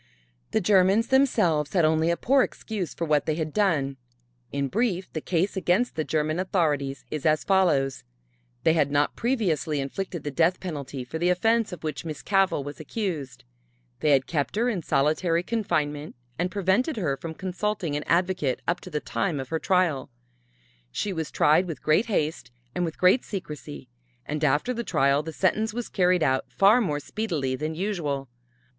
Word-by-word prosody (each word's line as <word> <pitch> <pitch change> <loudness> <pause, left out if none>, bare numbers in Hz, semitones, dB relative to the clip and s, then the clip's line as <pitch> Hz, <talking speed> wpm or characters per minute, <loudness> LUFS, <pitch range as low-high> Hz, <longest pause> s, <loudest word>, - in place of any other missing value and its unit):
The - - +1
Germans 195 +3 +4
themselves 210 - +2
had 175 -4 +4
only 160 +1 +2
a 170 - +1
poor 275 +1 +3
excuse 210 -8 -3
for 170 - -3
what 150 -2 +1
they 155 - +1
had 155 -1 -3
done. 155 -10 +1 0.5
In 140 0 -1
brief 190 - -1
the 155 - -3
case 180 +4 0
against 190 +6 +1
the 155 - 0
German 155 +2 -1
authorities 150 -7 0
is 150 -3 -3
as 155 -1 +2
follows: 155 -9 +2 0.6
they 160 - +4
had 150 -4 +2
not 145 +1 +1
previously 180 - 0
inflicted 170 +4 -4
the 145 - -3
death 170 +5 +2
penalty 140 -7 -5
for 160 +6 -6
the 175 +2 +2
offense 225 +5 +2
of 180 - -8
which 150 -5 -4
Miss 155 -3 -6
Cavell 195 -7 +2
was 145 +1 -8
accused; 155 - -4 0.6
they 150 - +1
had 135 -2 +4
kept 145 0 -2
her 235 +3 +2
in 200 -7 -2
solitary 165 +4 +1
confinement 150 -9 -2 0.2
and 180 +1 +1
prevented 205 - +1
her 155 -9 0
from 160 +3 -7
consulting 185 -3 -2
an 145 - -1
advocate 175 -6 +1
up 175 +1 +1
to - - -9
the 150 -3 -2
time 170 -8 -2
of 130 - -6
her 160 - -1
trial; 175 -8 +1 0.8
she 200 - -2
was 160 -3 -3
tried 155 +5 +3
with 165 - -6
great 155 +9 +3
haste 155 - -1 0.2
and 180 - 0
with 160 - -5
great 185 +8 +4
secrecy, 150 - -7 0.4
and 150 +1 -3
after 150 - +2
the 235 0 -3
trial 140 -6 +2
the 160 +1 -6
sentence 215 +6 0
was 240 -1 -4
carried 180 -3 +2
out 130 -1 0
far 210 +5 +5
more 150 -9 -1
speedily 155 -9 -2
than 155 +3 -3
usual. 155 -8 -2
165 Hz, 180 wpm, -26 LUFS, 150-195 Hz, 0.8 s, far